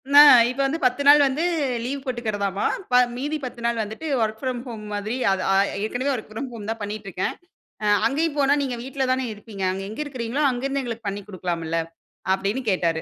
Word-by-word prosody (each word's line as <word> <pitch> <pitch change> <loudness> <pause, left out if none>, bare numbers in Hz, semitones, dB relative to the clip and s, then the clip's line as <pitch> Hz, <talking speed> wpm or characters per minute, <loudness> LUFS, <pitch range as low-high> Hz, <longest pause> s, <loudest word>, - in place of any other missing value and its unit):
நான் 290 -4 +10
இப்ப 255 +2 -6
வந்து 310 +5 -1
10 255 +3 +2
நாள் 290 +1 +9
வந்து 285 +5 -1 0.4
லீவ் 270 +2 -4
போட்டுக்கறதாமா, 210 -6 -2 0.3
ப - - -3 0.2
மீதி 295 +4 -2
10 245 -1 -7
நாள் 235 -1 +1
வந்துட்டு 220 +10 -7
வொர்க் 220 0 -1
ஃப்ரம் 255 -2 -2
ஹோம் 220 -3 -7
மாதிரி 210 +4 -2 0.2
ஆ - - +4 0.5
ஏற்கனவே 255 +6 -1
வொர்க் 220 -3 -6
ஃப்ரம் 245 +4 -5
ஹோம் 215 -2 -7
தான் 225 0 -3
பண்ணிட்டு 205 0 -5
இருக்கேன். 180 +1 -2 0.5
அ - - 0 0.2
அங்கேயும் 300 +4 -1
போனா 280 0 +4
நீங்க 260 -3 -2
வீட்ல 265 0 -2
தானே 260 0 -1
இருப்பீங்க. 205 -1 -8
அங்க 195 +1 -4
எங்க 225 +8 -5
இருக்கீங்களோ 260 +1 -2
அங்கிருந்து 270 +3 -2
எங்களுக்கு 230 -3 -5
பண்ணிக்கலாம்ல 175 -5 -3 0.5
அப்டின்னு 200 +7 -2
கேட்டாரு. 165 -3 0
235 Hz, 185 wpm, -23 LUFS, 205-270 Hz, 0.5 s, நான்